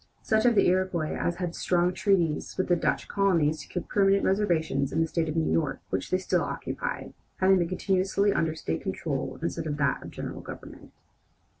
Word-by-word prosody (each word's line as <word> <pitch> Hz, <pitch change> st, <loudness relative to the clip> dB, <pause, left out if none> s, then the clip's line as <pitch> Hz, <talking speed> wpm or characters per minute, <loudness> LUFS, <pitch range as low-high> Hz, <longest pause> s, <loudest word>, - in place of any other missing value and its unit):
Such 220 Hz, +2 st, +3 dB
of 240 Hz, -, +4 dB
the -, -, +5 dB
Iroquois 180 Hz, -3 st, +1 dB
as 175 Hz, -, -1 dB
had 175 Hz, -1 st, -3 dB
strong 175 Hz, +1 st, +1 dB
treaties 175 Hz, -7 st, +1 dB
with 185 Hz, -, -1 dB
the 175 Hz, -, +5 dB
Dutch 170 Hz, -, -1 dB
colony 175 Hz, -7 st, +2 dB
secured 155 Hz, +3 st, -6 dB
permanent 195 Hz, -1 st, +3 dB
reservations 165 Hz, -9 st, +1 dB
in 160 Hz, -, 0 dB
the 165 Hz, -, +3 dB
State 160 Hz, -1 st, -1 dB
of 155 Hz, -, -3 dB
New 160 Hz, -1 st, +1 dB
York 150 Hz, -5 st, 0 dB
which -, -, -2 dB
they 185 Hz, -, +2 dB
still 185 Hz, -, 0 dB
occupy, -, -, -4 dB, 0.3 s
having 190 Hz, 0 st, +4 dB
been 170 Hz, -1 st, 0 dB
continuously 195 Hz, +2 st, +1 dB
under 160 Hz, -1 st, 0 dB
state 80 Hz, -, -3 dB
control -, -, -3 dB
instead -, -, -2 dB
of 145 Hz, -1 st, -2 dB
that 140 Hz, -3 st, +1 dB
of -, -, -8 dB
the -, -, -16 dB
general -, -, -5 dB
government. -, -, -10 dB
180 Hz, 195 wpm, -27 LUFS, 160-195 Hz, 0.3 s, the